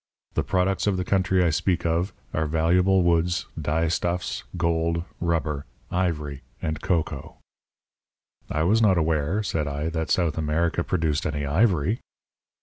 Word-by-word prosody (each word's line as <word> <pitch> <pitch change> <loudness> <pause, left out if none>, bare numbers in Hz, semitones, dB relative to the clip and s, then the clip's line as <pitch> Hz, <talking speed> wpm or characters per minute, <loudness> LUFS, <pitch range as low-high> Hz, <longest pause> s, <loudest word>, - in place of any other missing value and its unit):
The - - +1
products 95 +2 0
of 100 -2 +2
the 90 - -2
country 95 0 +2
I 85 - +3
speak 90 +2 0
of 85 +3 +1 0.2
are 80 0 0
valuable 90 +4 +3
woods, 85 +1 +2
dyestuffs, 85 +3 -1 0.2
gold, 85 0 +1 0.2
rubber, 80 -4 -1 0.2
ivory, 75 -6 -1 0.2
and 80 -1 -3
cocoa." 80 -5 -2 1.1
"I 75 - 0
was 110 +7 +3
not 100 -5 +4
aware," 80 +5 +1
said 80 -6 -1
I, 75 +3 -2
"that 80 -1 -3
South 85 -4 +1
America 80 +3 0
produced 80 -5 0
any 75 -1 -2
ivory." 90 +4 +2
85 Hz, 140 wpm, -25 LUFS, 80-90 Hz, 1.1 s, not